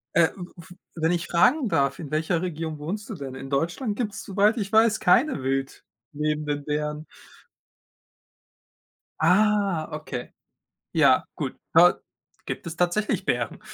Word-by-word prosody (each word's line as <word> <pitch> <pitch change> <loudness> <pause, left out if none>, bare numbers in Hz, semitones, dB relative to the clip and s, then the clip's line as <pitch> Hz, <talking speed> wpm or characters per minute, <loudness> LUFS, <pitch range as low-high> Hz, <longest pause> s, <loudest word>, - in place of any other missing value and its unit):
Äh. 165 -1 +5
W 180 -2 -7
w 175 +1 -13 0.3
wenn 165 +2 +3
ich 175 0 -2
fragen 245 - +3
darf, 140 -1 +1
in 150 -3 -8
welcher 160 +2 0
Region 160 -3 -4
wohnst 195 +9 -5
du 215 - -5
denn? 135 -4 -7
In 135 0 -8
Deutschland 170 - -1
gibt 215 -3 -2
es, - - -7
soweit 205 +3 +2
ich 200 -1 -3
weiß, 220 0 +4
keine 200 - +3
wild 135 0 -2 0.3
lebenden 150 -1 -2
Bären. 150 +1 -3 2.2
Ah, 200 -4 +3
okay. 150 -5 -6 0.6
Ja, - - +4
gut. - - -4 0.2
Dort - - +6 0.4
gibt - - -5
es 170 0 -6
tatsächlich 180 +4 0
Bären. - - -1
170 Hz, 145 wpm, -25 LUFS, 150-205 Hz, 2.2 s, Dort